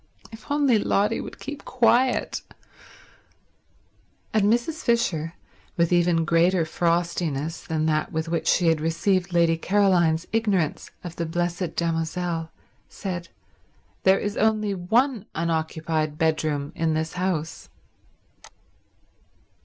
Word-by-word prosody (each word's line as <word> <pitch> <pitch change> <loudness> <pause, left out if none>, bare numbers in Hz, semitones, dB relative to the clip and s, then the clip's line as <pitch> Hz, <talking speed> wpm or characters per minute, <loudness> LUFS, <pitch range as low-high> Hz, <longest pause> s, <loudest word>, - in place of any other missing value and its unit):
If 225 +6 -13
only 285 -6 +3
Lotty 205 +2 +1
would - - -9
keep 285 +1 -7
quiet... 245 +1 +2 1.9
And 210 -1 +3
Mrs. 240 +7 0
Fisher, 170 -9 0 0.4
with 170 0 +2
even 170 -1 +3
greater 170 +1 +3
frostiness 165 -2 -1
than 155 -1 -1
that 155 -1 0
with 160 -1 -2
which 165 -1 -2
she 175 -2 +4
had 160 -2 +1
received 175 +3 0
Lady 170 -1 +3
Caroline's 175 -4 +2
ignorance 205 -8 0
of 175 -2 -8
the 170 - -2
Blessed 175 +1 -2
Damozel, 165 0 -2 0.4
said, 180 -4 -5 0.7
"There 190 +1 +5
is 205 0 -3
only 215 -2 +2
one 220 +6 +1
unoccupied 160 -1 -1
bedroom 155 -3 0
in 160 -1 0
this 160 +1 -2
house." 180 -3 -3
170 Hz, 115 wpm, -24 LUFS, 160-200 Hz, 1.9 s, There